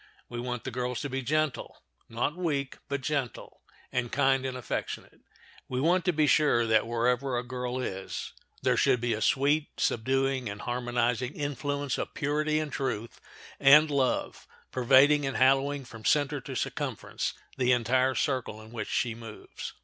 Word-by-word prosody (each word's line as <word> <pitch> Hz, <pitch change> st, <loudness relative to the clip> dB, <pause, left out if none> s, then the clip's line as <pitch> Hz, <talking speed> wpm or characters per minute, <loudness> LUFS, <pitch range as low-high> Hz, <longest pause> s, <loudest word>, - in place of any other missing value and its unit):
We 120 Hz, -, -5 dB
want 125 Hz, -1 st, -4 dB
the 130 Hz, -, -4 dB
girls 125 Hz, 0 st, -2 dB
to 145 Hz, -, -4 dB
be 135 Hz, 0 st, -2 dB
gentle—not 145 Hz, -2 st, -2 dB
weak, 145 Hz, -7 st, -2 dB
but 140 Hz, -1 st, -2 dB
gentle—and 125 Hz, -2 st, -4 dB
kind 135 Hz, -1 st, +2 dB
and 130 Hz, -1 st, -4 dB
affectionate. 125 Hz, -, -5 dB, 0.5 s
We 125 Hz, -, -1 dB
want 170 Hz, +5 st, +2 dB
to 180 Hz, -, +4 dB
be 155 Hz, -2 st, +2 dB
sure 145 Hz, -6 st, +4 dB
that 110 Hz, 0 st, +3 dB
wherever 125 Hz, +2 st, +1 dB
a 120 Hz, -, -1 dB
girl 125 Hz, 0 st, -4 dB
is 95 Hz, -7 st, -5 dB, 0.3 s
there -, -, +3 dB
should 125 Hz, -, +3 dB
be 120 Hz, 0 st, 0 dB
a 110 Hz, -, -3 dB
sweet, 145 Hz, +4 st, +2 dB
subduing, 130 Hz, +1 st, +1 dB
and 100 Hz, +1 st, -7 dB
harmonizing 120 Hz, +1 st, -1 dB
influence 145 Hz, -1 st, -2 dB
of -, -, -4 dB
purity 150 Hz, +1 st, 0 dB
and 155 Hz, -2 st, -2 dB
truth 120 Hz, -5 st, -3 dB, 0.4 s
and 150 Hz, +2 st, +7 dB
love 135 Hz, -3 st, 0 dB, 0.2 s
pervading 135 Hz, +4 st, +5 dB
and 135 Hz, -, -2 dB
hallowing 135 Hz, +1 st, +3 dB
from 115 Hz, -2 st, -11 dB
center 145 Hz, +1 st, +2 dB
to 130 Hz, +1 st, -7 dB
circumference -, -, -3 dB, 0.2 s
the 125 Hz, -1 st, +3 dB
entire 130 Hz, +2 st, +2 dB
circle 130 Hz, -6 st, -1 dB
in 110 Hz, 0 st, -13 dB
which 115 Hz, -2 st, -5 dB
she 120 Hz, -2 st, 0 dB
moves. 115 Hz, -2 st, -9 dB
130 Hz, 155 wpm, -29 LUFS, 120-145 Hz, 0.5 s, and